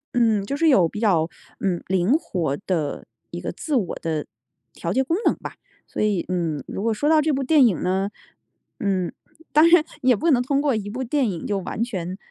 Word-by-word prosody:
嗯， 225 Hz, -4 st, +3 dB
就 280 Hz, +6 st, -3 dB
是 325 Hz, 0 st, +4 dB
有 185 Hz, -, +5 dB
比 210 Hz, -, -7 dB
较， 175 Hz, -7 st, +2 dB, 0.3 s
嗯， 180 Hz, -3 st, -1 dB
灵 190 Hz, +6 st, +2 dB
活 170 Hz, -, -1 dB
的 160 Hz, -6 st, -2 dB, 0.2 s
一 -, -, -6 dB
个 -, -, -4 dB
自 305 Hz, -3 st, -3 dB
我 210 Hz, -9 st, 0 dB
的 155 Hz, -2 st, -2 dB, 0.5 s
调 170 Hz, -, -4 dB
节 265 Hz, +5 st, +2 dB
功 330 Hz, +6 st, 0 dB
能 -, -, +4 dB
吧。 -, -, -8 dB, 0.3 s
所 -, -, -4 dB
以， 205 Hz, -4 st, +1 dB
嗯， 165 Hz, -6 st, -1 dB
如 -, -, -5 dB
果 225 Hz, -1 st, +1 dB
说 290 Hz, +8 st, 0 dB
到 315 Hz, -1 st, +5 dB
这 310 Hz, +1 st, +1 dB
部 270 Hz, -1 st, 0 dB
电 285 Hz, -1 st, +5 dB
影 190 Hz, -, -1 dB
呢 190 Hz, +2 st, 0 dB, 0.7 s
嗯， 190 Hz, -4 st, 0 dB, 0.4 s
当 310 Hz, +3 st, +7 dB
然， 340 Hz, -2 st, +6 dB, 0.2 s
也 255 Hz, -2 st, +4 dB
不 330 Hz, +9 st, +1 dB
能 245 Hz, -2 st, +4 dB
通 275 Hz, +2 st, +1 dB
过 285 Hz, -4 st, +1 dB
一 205 Hz, -2 st, -3 dB
部 255 Hz, +5 st, -4 dB
电 255 Hz, -2 st, +1 dB
影 170 Hz, -4 st, -5 dB
就 200 Hz, -2 st, -1 dB
完 215 Hz, +4 st, -3 dB
全 185 Hz, -5 st, -4 dB
210 Hz, 230 characters per minute, -23 LUFS, 180-270 Hz, 0.7 s, 当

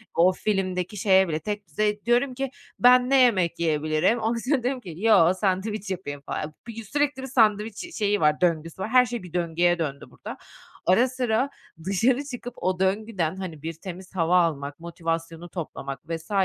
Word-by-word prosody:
o 175 Hz, +2 st, +5 dB
filmdeki 190 Hz, -1 st, -2 dB
şeye 190 Hz, -1 st, +4 dB
bile 155 Hz, -2 st, -2 dB
tekdüzeye 210 Hz, +1 st, -2 dB
diyorum 245 Hz, +3 st, +2 dB
ki 270 Hz, +1 st, -3 dB, 0.3 s
"Ben 250 Hz, +1 st, +6 dB
ne 270 Hz, -1 st, +5 dB
yemek 185 Hz, -8 st, +3 dB
yiyebilirim?" 155 Hz, +7 st, +1 dB
ondan 225 Hz, +1 st, 0 dB
sonra 275 Hz, -5 st, +2 dB
diyorum 255 Hz, +1 st, -1 dB
ki 175 Hz, -7 st, -8 dB
"Yok, 190 Hz, -4 st, +4 dB
sandviç 200 Hz, +2 st, -1 dB
yapayım 145 Hz, -7 st, -5 dB
falan." 150 Hz, +2 st, -5 dB
Bi 230 Hz, -1 st, -7 dB
sürekli 285 Hz, +3 st, -1 dB
bir 265 Hz, -, -5 dB
sandviç 215 Hz, -4 st, +2 dB
ş 335 Hz, -, -8 dB
şeyi 205 Hz, -7 st, 0 dB
var, 150 Hz, +1 st, +3 dB
döngüsü 165 Hz, 0 st, 0 dB
var. 200 Hz, -, -2 dB
Her 250 Hz, +1 st, +6 dB
şey 235 Hz, -4 st, -5 dB
bir 175 Hz, -2 st, -11 dB
döngüye 175 Hz, 0 st, +1 dB
döndü 140 Hz, -4 st, -3 dB
burada. -, -, -9 dB, 0.5 s
Ara 225 Hz, +8 st, +4 dB
sıra 255 Hz, 0 st, 0 dB, 0.4 s
dışarı 240 Hz, +8 st, +2 dB
çıkıp 245 Hz, -3 st, -7 dB
o 185 Hz, 0 st, -1 dB
döngüden 190 Hz, -3 st, 0 dB
hani 165 Hz, -6 st, -6 dB
bir 165 Hz, +1 st, -4 dB
temiz 185 Hz, +2 st, -10 dB
hava 175 Hz, +1 st, +4 dB
almak, 145 Hz, -3 st, -2 dB
motivasyonu 165 Hz, 0 st, -4 dB
toplamak 140 Hz, -5 st, -6 dB
vs. 165 Hz, +4 st, -6 dB
190 Hz, 175 wpm, -25 LUFS, 165-230 Hz, 0.5 s, Ben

